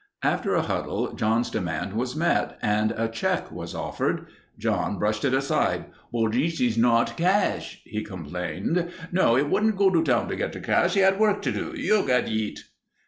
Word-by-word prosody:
After - - +1
a - - +2
huddle, - - -2
John's 110 +3 0
demand 95 -1 -3
was 125 +4 -2
met 165 +2 +1
and 105 +1 +2
a 115 0 +1
check 115 0 -2
offered. - - -3 0.3
John - - -1
brushed 105 0 0
it 130 - +2
aside. 135 0 0 0.2
"But 115 -2 +1
this 160 +8 0
eez 120 -3 +2
not 115 0 +3
cash," 185 +4 0
he 105 +1 -4
complained. 90 - -3 0.2
No, 175 -10 +4
he 135 - +4
wouldn't 215 +8 +1
go 195 -1 +4
to 165 -3 +3
town 125 -7 +2
to - - -2
get - - -3
the - - -6
cash. 175 +2 +2
He 195 - +4
had 190 +1 +4
work 210 -2 +2
to - - 0
do. 330 - -4
"You 215 -7 +3
get 125 -1 +2
eet." 110 -1 -3
125 Hz, 185 wpm, -25 LUFS, 110-175 Hz, 0.3 s, No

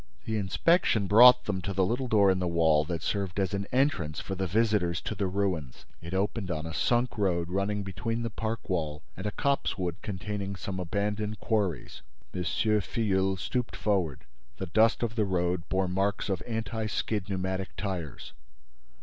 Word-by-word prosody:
The 110 - -1
inspection 110 - +2
brought 125 +5 +8
them 95 -3 -2
to 100 +2 -3
the 95 0 +2
little 125 +6 -1
door 100 -4 +5
in 95 - 0
the 90 - 0
wall 80 -3 +3
that 85 -1 -4
served 100 +1 -2
as 95 0 0
an 100 0 -2
entrance 125 - +1
for 95 - -5
the 95 0 -2
visitors 105 -4 +2
to - - -3
the 100 -2 -1
ruins. 90 -9 -2 0.2
It 85 +3 -5
opened 100 +1 -1
on 80 -2 -2
a 80 - -5
sunk 120 +5 +1
road 85 -4 +1
running 100 +2 -1
between 105 +5 -3
the 115 - -3
park 110 0 -4
wall 80 -5 -2
and 95 +3 -4
a - - -1
copsewood 95 -10 -1
containing 100 -1 -4
some 95 0 -5
abandoned 105 +4 -2
quarries. 100 - -1 0.3
M. 90 - -3
Filleul 95 +2 +1
stooped 120 +8 -2
forward: 85 -10 -1 0.3
the 95 - -3
dust 110 +7 +3
of 115 -1 -2
the 110 -2 +2
road 90 -2 -1
bore 95 0 +1
marks 95 +3 0
of 95 -3 -1
anti 110 -1 -2
skid 105 -2 -2
pneumatic 95 0 -3
tires. 90 - -5
95 Hz, 175 wpm, -29 LUFS, 90-110 Hz, 0.3 s, brought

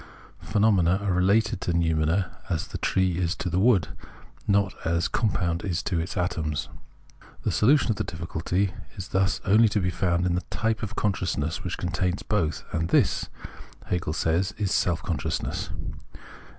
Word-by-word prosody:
Phenomena 100 -5 +3
are 100 -2 +1
related 95 +2 +2
to 90 - -1
noumena 80 +2 +1
as 80 -2 -1
the - - -5
trees 90 -2 +1
to 90 - -3
the 90 - +1
wood, 100 - +4 0.6
not 100 -2 +2
as 85 +1 +1
a - - 0
compound 90 -6 0
to 90 -2 -1
its 80 +3 -4
atoms. 80 -4 -1 0.7
The - - +1
solution 130 +2 +4
of 105 - -2
the - - 0
diffi 85 0 -6
culty 90 +4 0 0.3
is 95 -1 -6
thus 95 0 +1
only 110 +3 +5
to 105 - +1
be 90 -1 0
found 90 0 +1
in 90 - +1
the 90 - 0
type 110 -1 -1
of 105 - -4
consciousness 85 -6 -1
which 90 - -3
contains 90 +1 -1
both 80 -8 0
— - - -20
and 80 0 0
this, - - +2 0.6
Hegel 85 -3 0
says, 85 +3 0
is 100 -3 -1
self 85 -2 +1
consciousness. 80 -4 -2
90 Hz, 165 wpm, -26 LUFS, 85-100 Hz, 0.7 s, only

